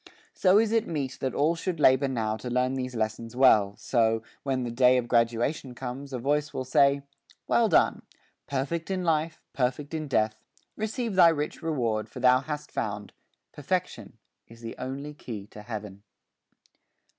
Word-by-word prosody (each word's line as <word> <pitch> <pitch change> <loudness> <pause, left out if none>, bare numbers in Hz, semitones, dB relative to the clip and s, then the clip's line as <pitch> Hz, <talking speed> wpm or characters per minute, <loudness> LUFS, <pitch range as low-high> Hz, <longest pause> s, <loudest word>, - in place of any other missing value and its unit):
So 190 +1 +4
is 220 0 +3
it 225 0 +1
meet 140 -5 -3
that 130 - -2
all 155 +4 +3
should 170 0 -3
labor 135 -1 +5
now 110 -5 -1
To 125 +3 -6
learn 125 +1 +1
these 130 -1 -4
lessons 110 +1 -3
well, 105 -6 +5
so, 115 -2 +1 0.2
when 130 -2 -1
the 120 - -3
day 125 +1 +5
Of 120 -1 -1
graduation 120 +3 0
comes, 135 +3 -6
a 130 - -3
Voice 145 +4 -1
will 130 - -3
say: 140 +2 +3 0.4
Well - - +3
done; - - +3 0.5
perfect 145 +6 -2
in 190 -1 -1
life, 160 -1 0
perfect 135 +3 -1
in 155 -1 -3
death; 110 -4 0 0.3
Receive 220 +1 -3
thy 180 -3 +7
rich 150 -2 -2
reward, 120 -10 -1
for - - -9
thou 125 0 +5
hast 150 +1 -6
found 105 -1 -4 0.4
Perfection - - -3 0.3
is 115 0 -15
the 115 -1 -7
only 135 +3 -5
key 110 -8 -7
to 105 - -10
Heaven. 105 -3 -7
130 Hz, 170 wpm, -27 LUFS, 115-150 Hz, 0.5 s, thy